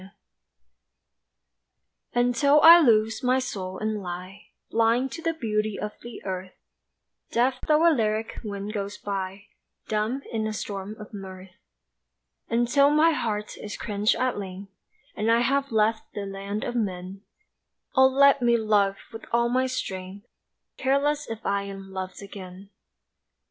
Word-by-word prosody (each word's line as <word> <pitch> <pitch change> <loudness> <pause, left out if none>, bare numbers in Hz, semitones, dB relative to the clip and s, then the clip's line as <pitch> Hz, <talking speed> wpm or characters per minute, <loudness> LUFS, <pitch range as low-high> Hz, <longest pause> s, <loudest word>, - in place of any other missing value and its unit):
A - - -12 2.1
PRAYER 245 - +3
UNTIL 280 +4 +4
I 335 +1 +10
lose 225 -6 +3
my 255 +1 +3
soul 190 -8 -4
and 215 0 -2
lie 185 +2 -8 0.2
Blind 230 +3 +2
to 330 - -7
the 330 0 -1
beauty 215 -6 -1
of 210 - -3
the 235 -1 -10
earth, 185 -1 -5 0.7
Deaf 255 +2 +1
tho' 310 +2 +5
a 335 - +6
lyric 220 -3 -1
wind 205 -1 -5
goes 205 -1 -4
by, 195 0 -4 0.4
Dumb 220 +6 -1
in 220 -1 -1
a 215 - -3
storm 205 0 -5
of 210 +1 -11
mirth; 190 -2 -9 1.0
Until 240 +5 +3
my 305 +3 +5
heart 210 -8 -2
is 210 - -6
quenched 210 -1 0
at 255 -4 -1
length 195 0 -8 0.4
And 215 +2 +1
I 230 +1 +4
have 275 +2 +1
left 220 0 +1
the 205 - -3
land 200 +2 -5
of - - -3
men, 190 -3 -3 0.7
Oh 265 -1 +7
let 280 +1 +5
me 235 -1 +4
love 205 -3 +2 0.2
with 225 - -8
all 235 0 +2
my 255 +1 +1
strength 195 -5 -5 0.5
Careless 285 +2 +1
if 225 0 -7
I 200 0 +1
am 195 -1 -9
loved 185 +1 -6
again. 195 0 -10
215 Hz, 150 wpm, -26 LUFS, 200-250 Hz, 2.1 s, I